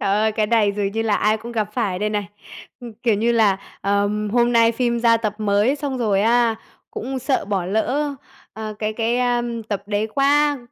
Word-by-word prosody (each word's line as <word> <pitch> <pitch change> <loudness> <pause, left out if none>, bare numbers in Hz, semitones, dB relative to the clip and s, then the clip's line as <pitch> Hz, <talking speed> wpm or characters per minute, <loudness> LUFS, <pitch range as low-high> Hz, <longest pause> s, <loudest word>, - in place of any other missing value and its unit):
Trời 200 - -1
ơi! 215 +2 +2
Cái 215 -1 0
này 215 -3 +2
dường 200 -1 -2
như 225 +1 -1
là 215 -2 +1
ai 215 +1 +2
cũng 230 +2 -9
gặp 215 -2 -2
phải 210 -6 -1
đây 210 +2 -1
này. 205 -2 -2 0.5
Ưm, 240 -2 -9
kiểu 230 -3 +3
như 230 +4 +1
là, 210 -4 +3 0.2
ờm, 205 +1 0
hôm 240 +1 +2
nay 230 0 +4
phim 235 0 0
ra 230 -1 +4
tập 215 -2 -2
mới, 210 +5 +2
xong 280 -3 -4
rồi 210 -5 +1
á 230 0 +3 0.3
cũng 260 +3 -4
sợ 260 +1 -1
bỏ 195 -3 -2
lỡ, 260 +9 -1 0.4
ờ, 215 -1 -6
cái 215 0 -2
cái, 230 +2 0
a, 245 -1 +1 0.3
tập 200 -2 -2
đấy 205 +1 -1
quá, 290 +1 +3
220 Hz, 215 wpm, -21 LUFS, 210-240 Hz, 0.5 s, nay